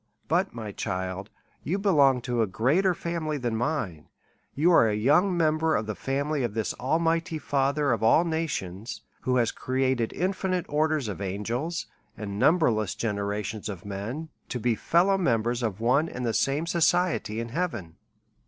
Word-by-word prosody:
But, 180 +5 +1
my 110 -3 -6
child, 95 0 -4 0.3
you 185 - -1
belong 145 -11 +4
to 120 -1 -1
a 110 - +2
greater 150 - +2
family 165 -3 -3
than 120 -4 -2
mine, 110 - -2 0.5
you 160 +6 +4
are 140 -9 +6
a 105 - 0
younger 150 - +3
member 160 -2 +2
of 110 - 0
the 110 - -3
family 140 +5 -1
of 115 -4 -2
this 110 -2 -1
Almighty 165 +4 +1
Father 140 0 +1
of 115 - 0
all 115 +10 +5
nations, 120 - -3 0.2
who 125 - 0
has 120 -3 +2
created 130 -2 0
infi 190 +1 -1
nite 180 -2 0
orders 155 -3 +1
of 105 -1 -5
angels 115 - -3 0.3
and 100 -1 -5
numberless 115 - +3
generations 105 0 -3
of 95 -3 -7
men, 110 +11 -5 0.2
to 125 - -3
be 120 +1 +1
fellow 180 - +2
members 120 -6 +1
of 110 -4 -2
one 130 +8 +2
and 125 0 -4
the 115 - 0
same 140 +7 +1
soci 175 +1 +3
ety 110 +2 -6
in 115 0 -4
heaven. 115 - -3
130 Hz, 170 wpm, -27 LUFS, 110-160 Hz, 0.5 s, are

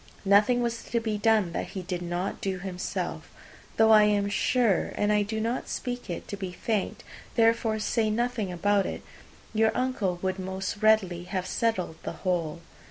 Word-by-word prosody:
Nothing 210 +5 +4
was 235 0 -2
to 235 - 0
be 220 -2 -2
done 215 -4 +3
that - - -3
he 185 - -3
did 180 0 -4
not 175 +2 -3
do 190 -1 -1
himself; 180 -1 -4 0.5
though 220 0 +6
I 215 -1 +8
am 205 -1 +2
sure 225 -1 +2
(and 205 0 +2
I 210 - +3
do 215 +2 -2
not 230 +3 -2
speak 245 -3 -4
it 170 - -5
to - - -3
be 190 -2 -5
thanked, 210 +3 -2 0.3
therefore 225 -1 +3
say 220 +1 0
nothing 230 -3 -1
about 200 +3 +2
it) - - -5 0.5
your 220 0 +4
uncle 245 -8 0
would 185 0 -1
most 190 +1 -3
readily 205 -5 +3
have 185 0 -3
settled 185 -5 -1
the - - -5
whole. 170 -2 -1
205 Hz, 175 wpm, -27 LUFS, 185-225 Hz, 0.5 s, I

